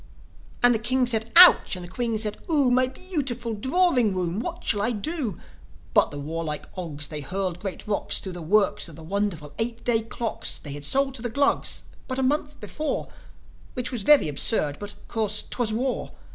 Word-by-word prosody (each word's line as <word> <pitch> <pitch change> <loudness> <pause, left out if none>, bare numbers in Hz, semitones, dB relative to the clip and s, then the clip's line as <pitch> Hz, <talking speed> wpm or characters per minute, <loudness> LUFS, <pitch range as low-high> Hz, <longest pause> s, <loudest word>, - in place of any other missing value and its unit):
And 245 0 +7
the 225 - 0
King 255 +3 +1
said, 225 -2 0
"Ouch!" 360 - +9
And 180 -1 -7
the - - -10
Queen 230 +4 -2
said, 215 -1 -1
"0o! 285 -6 +2
My 255 +1 +3
bee 365 +8 -12
ootiful 240 -5 -1
drawing 260 - +2
room! 180 +1 -2
What 235 - -5
shall 205 - +1
I 225 +4 +1
do?" 245 - -3 0.5
But - - +4
the 145 - -8
warlike 155 +1 -4
Ogs, 150 -6 -4
they 150 -2 -5
hurled 180 +3 -3
great 195 -1 -6
rocks 210 -2 +1
Thro' 190 - -3
the 175 -1 -8
works 195 +1 +1
of 160 - -12
the 160 - -11
wonderful 170 -5 -3
eight 230 +1 -2
day 230 -2 +2
clocks 230 0 -2
They 145 - -9
had 145 0 -6
sold 270 - +1
to 250 - -7
the 240 - -2
Glugs 280 +5 +1 0.2
but 255 - -4
a 265 - 0
month 295 +2 -1
before 305 0 -4 0.7
Which 250 0 -3
was 245 -4 -2
very 285 - +5
absurd; 145 0 +1
but, 205 0 -6
of - - -21
course, 215 -2 0
'twas 240 -3 -1
war. 250 +4 -2
220 Hz, 200 wpm, -25 LUFS, 180-255 Hz, 0.7 s, Ouch